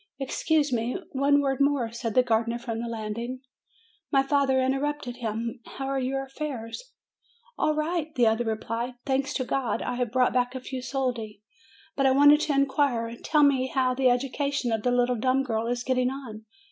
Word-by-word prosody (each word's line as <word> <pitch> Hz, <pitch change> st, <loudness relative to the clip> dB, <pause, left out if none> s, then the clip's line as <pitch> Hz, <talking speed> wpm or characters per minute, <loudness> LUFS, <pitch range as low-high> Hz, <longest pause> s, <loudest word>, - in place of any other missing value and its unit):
"Excuse 290 Hz, +1 st, 0 dB
me; 235 Hz, +1 st, -1 dB
one 285 Hz, +1 st, +3 dB
word 270 Hz, -1 st, 0 dB
more," 275 Hz, -5 st, +2 dB
said 230 Hz, -2 st, -4 dB
the 255 Hz, -, +6 dB
gardener, 230 Hz, 0 st, +1 dB
from 230 Hz, -1 st, -4 dB
the 235 Hz, -, -4 dB
landing. 230 Hz, +3 st, -4 dB, 0.7 s
My 270 Hz, -2 st, +4 dB
father 270 Hz, -1 st, +2 dB
interrupted 270 Hz, -1 st, -1 dB
him, 230 Hz, +1 st, -3 dB, 0.2 s
"How 270 Hz, -, -3 dB
are 270 Hz, 0 st, -1 dB
your 270 Hz, +1 st, -1 dB
affairs?" 270 Hz, -, -6 dB, 0.6 s
"All 305 Hz, -, +1 dB
right," 315 Hz, +1 st, -1 dB
the 245 Hz, -, +4 dB
other 225 Hz, +2 st, +2 dB
replied. 230 Hz, +2 st, -3 dB
"Thanks 275 Hz, +1 st, 0 dB
to 260 Hz, -, 0 dB
God, 250 Hz, -3 st, -1 dB
I 245 Hz, -, -3 dB
have 245 Hz, -3 st, -1 dB
brought 255 Hz, 0 st, +2 dB
back 250 Hz, 0 st, +1 dB
a -, -, -3 dB
few 255 Hz, 0 st, -6 dB
soldi. 245 Hz, -6 st, -3 dB, 0.5 s
But 275 Hz, -1 st, +3 dB
I -, -, +4 dB
wanted 290 Hz, +2 st, +7 dB
to 305 Hz, -1 st, 0 dB
in 275 Hz, 0 st, +4 dB
quire. 245 Hz, -5 st, 0 dB
Tell 300 Hz, +5 st, +2 dB
me 265 Hz, -2 st, +3 dB
how 260 Hz, -1 st, +1 dB
the 255 Hz, 0 st, +3 dB
education 270 Hz, +1 st, 0 dB
of 220 Hz, -1 st, 0 dB
the 245 Hz, -, +1 dB
little 245 Hz, 0 st, +2 dB
dumb 260 Hz, +4 st, +2 dB
girl 225 Hz, -3 st, -2 dB
is 245 Hz, 0 st, -1 dB
getting 255 Hz, -1 st, +1 dB
on. 240 Hz, -5 st, -8 dB
255 Hz, 190 wpm, -26 LUFS, 235-275 Hz, 0.7 s, wanted